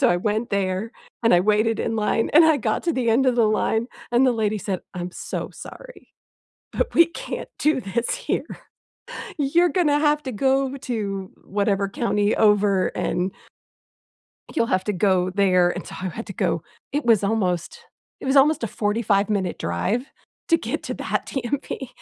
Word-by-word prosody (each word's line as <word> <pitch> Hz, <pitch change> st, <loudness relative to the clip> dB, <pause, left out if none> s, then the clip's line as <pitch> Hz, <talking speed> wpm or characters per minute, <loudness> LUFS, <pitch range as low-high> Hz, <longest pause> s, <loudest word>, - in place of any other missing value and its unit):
So 260 Hz, -, +5 dB
I 175 Hz, -, +3 dB
went 215 Hz, +5 st, -1 dB
there 200 Hz, +3 st, -1 dB, 0.3 s
and 230 Hz, -, +5 dB
I 175 Hz, -, +5 dB
waited 215 Hz, +3 st, +2 dB
in 225 Hz, -, -1 dB
line 220 Hz, +1 st, 0 dB
and 325 Hz, -, +9 dB
I 315 Hz, -2 st, +5 dB
got 215 Hz, -4 st, -1 dB
to 335 Hz, -, +1 dB
the 240 Hz, -3 st, +1 dB
end 265 Hz, +4 st, +3 dB
of 250 Hz, -1 st, +2 dB
the 230 Hz, -, +4 dB
line, 220 Hz, +2 st, +1 dB, 0.3 s
and 250 Hz, +2 st, +4 dB
the 255 Hz, -, +4 dB
lady 215 Hz, -2 st, 0 dB
said, 190 Hz, -2 st, -3 dB
"I'm 180 Hz, 0 st, -4 dB
so -, -, -5 dB
sorry, -, -, -12 dB, 0.6 s
but -, -, -2 dB
we 335 Hz, -, +7 dB
can't -, -, -6 dB
do 295 Hz, -4 st, +2 dB
this 215 Hz, +5 st, -2 dB
here. -, -, -2 dB, 0.9 s
You're 335 Hz, +5 st, +3 dB
gonna 300 Hz, -6 st, +2 dB
have 300 Hz, 0 st, +2 dB
to 260 Hz, -, -4 dB
go 270 Hz, +4 st, +1 dB
to 205 Hz, -7 st, -4 dB
whatever 200 Hz, 0 st, 0 dB
county 205 Hz, 0 st, 0 dB
over 205 Hz, -3 st, +3 dB
and" 180 Hz, +2 st, -2 dB, 1.2 s
"you'll 230 Hz, -, +2 dB
have 185 Hz, -4 st, 0 dB
to 210 Hz, -, -1 dB
go 185 Hz, -1 st, +2 dB
there." 185 Hz, -2 st, +3 dB
And -, -, -5 dB
so -, -, -9 dB
I 185 Hz, -, -2 dB
had 220 Hz, +7 st, -7 dB
to 200 Hz, -, -6 dB
go. 165 Hz, -, -1 dB, 0.3 s
It 290 Hz, -1 st, -1 dB
was 220 Hz, -4 st, +4 dB
almost 185 Hz, -5 st, -1 dB, 0.4 s
it -, -, -7 dB
was 270 Hz, +1 st, +2 dB
almost 290 Hz, 0 st, +5 dB
a 230 Hz, -, -2 dB
forty-five-minute 205 Hz, -3 st, 0 dB
drive 190 Hz, -, -1 dB, 0.4 s
to 330 Hz, -, +5 dB
get -, -, -4 dB
to -, -, -3 dB
that -, -, -2 dB
DMV. 265 Hz, 0 st, -4 dB
220 Hz, 180 wpm, -23 LUFS, 195-265 Hz, 1.2 s, and